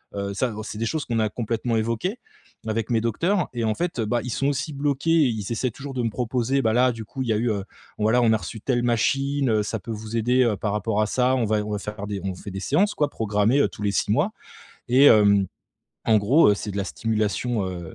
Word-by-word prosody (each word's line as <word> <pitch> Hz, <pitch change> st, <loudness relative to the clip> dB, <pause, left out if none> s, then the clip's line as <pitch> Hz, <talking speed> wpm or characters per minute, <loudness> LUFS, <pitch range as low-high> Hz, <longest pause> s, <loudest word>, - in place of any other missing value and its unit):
heu, 100 Hz, 0 st, -3 dB
ça 120 Hz, +5 st, 0 dB
bon 110 Hz, 0 st, -6 dB
c'est 105 Hz, -, -7 dB
des 115 Hz, -, -1 dB
choses 155 Hz, +5 st, -2 dB
qu'on 115 Hz, -2 st, -1 dB
a 110 Hz, -1 st, +1 dB
complètement 115 Hz, +1 st, -2 dB
évoquées 115 Hz, -, -2 dB, 0.5 s
avec 110 Hz, 0 st, -2 dB
mes 115 Hz, -2 st, +2 dB
docteurs. 170 Hz, -, 0 dB
Et 120 Hz, -1 st, -2 dB
en 110 Hz, -1 st, 0 dB
fait, 175 Hz, -7 st, -3 dB
heu, 110 Hz, -, +1 dB
bah, 120 Hz, +2 st, 0 dB
ils 125 Hz, -, -5 dB
sont 135 Hz, -, 0 dB
aussi 140 Hz, +2 st, -1 dB
bloqués 140 Hz, +2 st, 0 dB
et 165 Hz, -2 st, +5 dB
ils 110 Hz, -3 st, -3 dB
essaient 120 Hz, +2 st, 0 dB
toujours 135 Hz, +4 st, -8 dB
de 125 Hz, -, -2 dB
me 115 Hz, -, +1 dB
proposer, 125 Hz, +3 st, 0 dB
bah, 110 Hz, -, +2 dB
là 125 Hz, +2 st, +4 dB
du 115 Hz, -, -7 dB
coup 130 Hz, +4 st, -5 dB
il -, -, -5 dB
y -, -, +3 dB
a 105 Hz, -, +1 dB
eu, 120 Hz, +1 st, 0 dB
heu, 100 Hz, -2 st, -2 dB, 0.3 s
voilà, 110 Hz, +3 st, +3 dB
on 115 Hz, -2 st, +4 dB
a 110 Hz, -, +3 dB
reçu 110 Hz, 0 st, -8 dB
telle 120 Hz, -1 st, 0 dB
machine, 135 Hz, +3 st, +1 dB
heu, 110 Hz, -1 st, +2 dB
ça 110 Hz, +1 st, -3 dB
peut 115 Hz, -, -8 dB
vous 110 Hz, +1 st, -6 dB
aider, 125 Hz, +3 st, +3 dB
heu, 115 Hz, -4 st, +1 dB
par 105 Hz, +2 st, -2 dB
rapport 105 Hz, 0 st, 0 dB
à 105 Hz, -, +1 dB
ça, 125 Hz, +3 st, +2 dB
on 125 Hz, -, +1 dB
va 110 Hz, 0 st, +1 dB
on 105 Hz, -, -5 dB
va 105 Hz, -, -1 dB
faire 105 Hz, 0 st, -6 dB
des 100 Hz, -2 st, -4 dB
on 95 Hz, -, -2 dB
vous 90 Hz, -, -10 dB
fait 100 Hz, -, -7 dB
des 95 Hz, +1 st, -5 dB
séances 195 Hz, -, +2 dB
quoi 150 Hz, -1 st, +1 dB
programmées, 110 Hz, +2 st, +1 dB
heu, -, -, +3 dB
tous -, -, -12 dB
les 100 Hz, -, +1 dB
6 100 Hz, -, 0 dB
mois. -, -, +2 dB, 0.6 s
Et 130 Hz, +4 st, +5 dB
hem, 100 Hz, -5 st, +6 dB, 0.6 s
en 110 Hz, -, +4 dB
gros, 130 Hz, +11 st, +4 dB
heu, -, -, +4 dB
c'est 105 Hz, +1 st, -5 dB
de 100 Hz, -, -4 dB
la 100 Hz, -, -1 dB
stimulation, 110 Hz, +1 st, -1 dB
heu, 85 Hz, -3 st, -7 dB
115 Hz, 275 wpm, -24 LUFS, 105-130 Hz, 0.6 s, hem